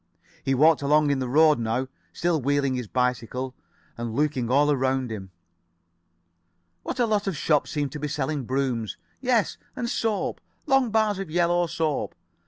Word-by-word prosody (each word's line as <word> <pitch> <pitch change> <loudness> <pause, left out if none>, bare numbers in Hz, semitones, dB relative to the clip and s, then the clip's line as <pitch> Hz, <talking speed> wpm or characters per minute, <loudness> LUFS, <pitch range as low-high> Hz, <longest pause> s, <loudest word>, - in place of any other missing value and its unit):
He 135 - +1
walked 155 +3 +5
along 150 +1 +3
in 140 - 0
the 130 - -2
road 150 +2 +5
now, 115 +3 -1 0.2
still 170 -3 0
wheeling 140 0 +1
his 125 -3 -3
bicycle, 125 +1 -1 0.4
and 115 -1 -5
looking 140 -5 0
all 145 +3 +4
around 130 -2 0
him. 95 -3 -6 1.5
What - - -5
a 240 - +4
lot 210 -2 0
of 185 -5 -1
shops 150 0 +1
seemed 145 -3 -2
to 150 - -6
be 150 - -2
selling 145 -1 -2
brooms. 125 -4 -1 0.2
Yes, 245 -5 +1 0.2
and 240 - -2
soap. 225 -3 -1 0.2
Long 270 -4 +3
bars 215 -2 +1
of 195 -4 -5
yellow 175 +1 +2
soap. 160 -3 -2
145 Hz, 165 wpm, -25 LUFS, 130-170 Hz, 1.5 s, walked